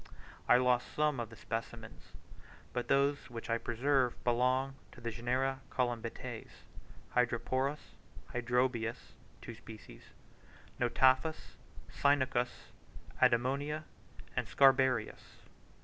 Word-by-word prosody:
I -, -, +8 dB
lost 125 Hz, -1 st, +1 dB
some 150 Hz, -3 st, +1 dB
of 115 Hz, -2 st, -4 dB
the 115 Hz, -, -12 dB
specimens, 115 Hz, -, -7 dB, 0.6 s
but 125 Hz, -, -2 dB
those 140 Hz, 0 st, +2 dB
which 115 Hz, -1 st, -6 dB
I 115 Hz, -, +1 dB
preserved 125 Hz, +2 st, 0 dB
belonged 130 Hz, +3 st, +2 dB, 0.2 s
to -, -, -13 dB
the 115 Hz, 0 st, -4 dB
genera 130 Hz, +3 st, -1 dB
Colymbetes, 120 Hz, -3 st, -3 dB, 0.6 s
Hydroporus, 130 Hz, +4 st, 0 dB, 0.4 s
Hydrobius 120 Hz, -1 st, -1 dB, 0.3 s
(two -, -, -7 dB
species), 110 Hz, -1 st, -12 dB, 0.8 s
Notaphus, 130 Hz, +5 st, +2 dB, 0.4 s
Cynucus, 130 Hz, -3 st, +1 dB, 0.5 s
Adimonia, 140 Hz, +6 st, +2 dB, 0.5 s
and -, -, -1 dB
Scarabaeus. 130 Hz, -4 st, +3 dB
125 Hz, 95 wpm, -33 LUFS, 120-135 Hz, 0.8 s, I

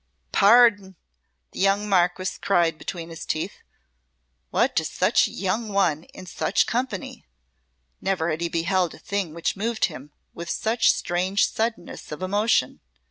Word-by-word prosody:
"Pardi!" 205 Hz, -3 st, +5 dB, 0.6 s
the -, -, -9 dB
young 200 Hz, +2 st, +2 dB
Marquess 185 Hz, -1 st, +1 dB
cried 170 Hz, -5 st, +1 dB
between 170 Hz, -3 st, -6 dB
his 165 Hz, -1 st, -8 dB
teeth. 160 Hz, +6 st, -3 dB, 0.9 s
"What -, -, +1 dB
does -, -, 0 dB
such -, -, +2 dB
a -, -, -10 dB
young 210 Hz, +4 st, -2 dB
one 175 Hz, -6 st, +1 dB
in 185 Hz, -, -12 dB
such -, -, 0 dB
company?" 235 Hz, -, -4 dB, 0.7 s
Never 180 Hz, -4 st, 0 dB
had 155 Hz, +1 st, -3 dB
he 170 Hz, -, -1 dB
beheld 170 Hz, +1 st, 0 dB
a -, -, -14 dB
thing 195 Hz, -6 st, -3 dB
which 170 Hz, -, -1 dB
moved 220 Hz, +3 st, 0 dB
him 150 Hz, -4 st, -8 dB, 0.2 s
with 170 Hz, 0 st, -7 dB
such 225 Hz, +2 st, +2 dB
strange 185 Hz, +3 st, 0 dB
suddenness 225 Hz, -5 st, -4 dB
of 150 Hz, +4 st, -6 dB
emotion. 205 Hz, -, +1 dB
185 Hz, 145 wpm, -24 LUFS, 170-205 Hz, 0.9 s, Pardi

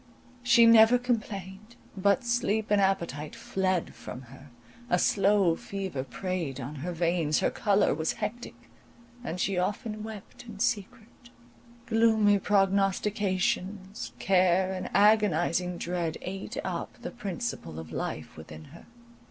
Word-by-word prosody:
She 245 Hz, -1 st, +6 dB
never 230 Hz, +1 st, +7 dB
complained, 215 Hz, -3 st, -4 dB, 0.2 s
but 200 Hz, +6 st, +2 dB
sleep 230 Hz, -3 st, 0 dB
and 205 Hz, -1 st, +4 dB
appetite 170 Hz, -6 st, -1 dB
fled 185 Hz, -2 st, -1 dB
from 130 Hz, -, -9 dB
her, 135 Hz, +2 st, -14 dB, 0.4 s
a 180 Hz, -, +3 dB
slow 195 Hz, -2 st, +3 dB
fever 190 Hz, -8 st, -5 dB
preyed 160 Hz, +1 st, -4 dB
on 140 Hz, +4 st, -6 dB
her 170 Hz, +6 st, -4 dB
veins, 170 Hz, -3 st, +1 dB
her -, -, +1 dB
colour 205 Hz, -2 st, +2 dB
was 160 Hz, +2 st, -1 dB
hectic, 225 Hz, +3 st, -7 dB, 0.5 s
and 180 Hz, -7 st, -4 dB
she 190 Hz, -1 st, 0 dB
often 210 Hz, +3 st, -3 dB
wept 220 Hz, 0 st, -9 dB
in 220 Hz, -3 st, -9 dB
secret; 225 Hz, +2 st, -3 dB, 0.6 s
gloomy 220 Hz, -3 st, +3 dB
prognostications, 195 Hz, 0 st, 0 dB
care, 185 Hz, 0 st, +2 dB
and 185 Hz, -, -5 dB
agonizing 180 Hz, -4 st, +3 dB
dread, 170 Hz, -2 st, -3 dB
ate 195 Hz, +1 st, -6 dB
up -, -, -5 dB
the -, -, -5 dB
principle 200 Hz, -, -5 dB
of 80 Hz, -1 st, -8 dB
life -, -, -5 dB
within 80 Hz, 0 st, -11 dB
her. 170 Hz, -, -14 dB
195 Hz, 125 wpm, -28 LUFS, 175-215 Hz, 0.6 s, never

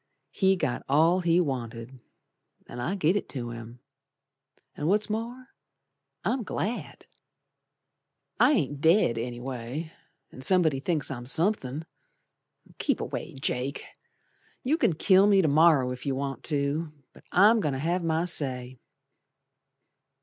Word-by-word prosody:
He 190 Hz, -1 st, +2 dB
got 130 Hz, -9 st, -2 dB
all 165 Hz, +6 st, +4 dB
he 170 Hz, -1 st, +2 dB
wanted, 125 Hz, -4 st, -4 dB, 0.6 s
An' 120 Hz, -, -9 dB
I 170 Hz, +11 st, -2 dB
give 180 Hz, -1 st, +2 dB
it 205 Hz, -, -2 dB
to 120 Hz, -3 st, -5 dB
him, 115 Hz, +1 st, -10 dB, 0.9 s
An' 150 Hz, -, -3 dB
what's 210 Hz, +3 st, +1 dB
more, 240 Hz, +4 st, -5 dB, 0.8 s
I'm 260 Hz, -, 0 dB
glad! 220 Hz, +2 st, -4 dB, 1.3 s
I -, -, +5 dB
ain't 145 Hz, -, -1 dB
dead, 160 Hz, -, +3 dB
anyway, 125 Hz, +5 st, -5 dB, 0.4 s
An' 130 Hz, -, -11 dB
somebody 160 Hz, -3 st, +2 dB
thinks 150 Hz, 0 st, -2 dB
I'm 120 Hz, -2 st, -6 dB
somethin'. 160 Hz, -2 st, +1 dB, 0.9 s
Keep -, -, 0 dB
away, -, -, -5 dB
Jake, 135 Hz, 0 st, -3 dB, 0.8 s
You 280 Hz, +4 st, +2 dB
can 310 Hz, -, +2 dB
kill 190 Hz, +5 st, +4 dB
me 195 Hz, -2 st, +4 dB
to -, -, +2 dB
morrer 145 Hz, -4 st, +4 dB
if 125 Hz, +2 st, -9 dB
you 135 Hz, -, 0 dB
want 135 Hz, 0 st, -4 dB
to, 150 Hz, +2 st, -1 dB, 0.2 s
But -, -, -18 dB
I'm 210 Hz, +5 st, +5 dB
goin' 150 Hz, -8 st, -1 dB
to 135 Hz, -, -3 dB
have 170 Hz, +4 st, -1 dB
my 165 Hz, +1 st, 0 dB
say. 130 Hz, -7 st, +1 dB
150 Hz, 135 wpm, -27 LUFS, 130-185 Hz, 1.3 s, I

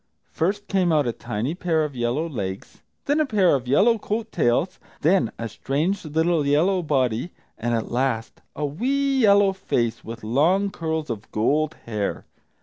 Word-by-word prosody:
First 205 Hz, +5 st, -1 dB
came 185 Hz, -3 st, +2 dB
out 150 Hz, -3 st, +3 dB
a 120 Hz, -, 0 dB
tiny 120 Hz, +5 st, -3 dB
pair 170 Hz, -3 st, 0 dB
of 145 Hz, -3 st, -4 dB
yellow 120 Hz, +7 st, -1 dB
legs; 100 Hz, -, -6 dB, 0.2 s
then 290 Hz, +2 st, +2 dB
a 310 Hz, -, +3 dB
pair 200 Hz, -7 st, +3 dB
of 130 Hz, -3 st, -1 dB
yellow 220 Hz, -, +4 dB
coat 220 Hz, +2 st, -3 dB
tails; 160 Hz, +6 st, +1 dB, 0.2 s
then 170 Hz, -, +3 dB
a 115 Hz, -, -4 dB
strange 150 Hz, -, -2 dB
little 160 Hz, +1 st, +1 dB
yellow 165 Hz, +7 st, +2 dB
body, 130 Hz, -3 st, 0 dB, 0.3 s
and, 120 Hz, 0 st, -1 dB
last, 120 Hz, -2 st, -2 dB
a 150 Hz, -, -2 dB
wee 270 Hz, -, 0 dB
yellow 200 Hz, -3 st, +5 dB
face, 120 Hz, -12 st, -1 dB
with 115 Hz, 0 st, -8 dB
long 170 Hz, -, +2 dB
curls 160 Hz, -5 st, -3 dB
of 105 Hz, -2 st, -7 dB
gold 150 Hz, +8 st, +1 dB
hair. 105 Hz, -3 st, -3 dB
155 Hz, 160 wpm, -23 LUFS, 120-190 Hz, 0.3 s, yellow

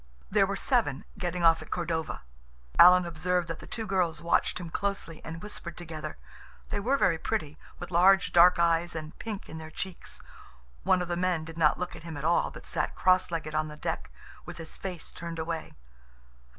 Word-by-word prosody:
There -, -, +4 dB
were -, -, -2 dB
seven, -, -, 0 dB
getting 175 Hz, 0 st, -2 dB
off 165 Hz, -1 st, +6 dB
at 155 Hz, -, -11 dB
Cordova. 165 Hz, -2 st, -2 dB, 0.6 s
Alan 180 Hz, +1 st, +9 dB
observed 175 Hz, +1 st, 0 dB
that 165 Hz, -, -4 dB
the -, -, -11 dB
two 225 Hz, -, -4 dB
girls 180 Hz, -5 st, +1 dB
watched 170 Hz, +2 st, +1 dB
him 170 Hz, -2 st, -7 dB
closely 195 Hz, -5 st, -3 dB
and 165 Hz, +1 st, -7 dB
whispered 180 Hz, -5 st, -6 dB
together. 160 Hz, -3 st, -6 dB, 0.5 s
They -, -, -1 dB
were 255 Hz, +7 st, +2 dB
very 170 Hz, -10 st, +2 dB
pretty, 150 Hz, -1 st, -3 dB, 0.2 s
with -, -, -8 dB
large, 190 Hz, +2 st, +5 dB
dark 175 Hz, +1 st, +7 dB
eyes 170 Hz, 0 st, +2 dB
and 155 Hz, 0 st, -6 dB
pink 215 Hz, -3 st, -5 dB
in 160 Hz, -, -8 dB
their 160 Hz, 0 st, -8 dB
cheeks. 180 Hz, +3 st, -6 dB, 0.6 s
One 180 Hz, -, +3 dB
of -, -, -6 dB
the 175 Hz, -, -1 dB
men 175 Hz, -3 st, 0 dB
did 165 Hz, 0 st, -9 dB
not 160 Hz, -2 st, +3 dB
look 180 Hz, 0 st, -4 dB
at -, -, -10 dB
him 165 Hz, -2 st, -7 dB
at 140 Hz, -, -6 dB
all, 170 Hz, +1 st, +3 dB
but -, -, -12 dB
sat -, -, -2 dB
cross 185 Hz, 0 st, +3 dB
legged 160 Hz, -2 st, -4 dB
on 155 Hz, 0 st, 0 dB
the 150 Hz, 0 st, -9 dB
deck, -, -, -3 dB, 0.3 s
with -, -, -9 dB
his 165 Hz, -1 st, -7 dB
face 185 Hz, -3 st, -6 dB
turned 170 Hz, -1 st, -6 dB
away. 160 Hz, 0 st, -4 dB
170 Hz, 200 wpm, -29 LUFS, 160-180 Hz, 0.6 s, Alan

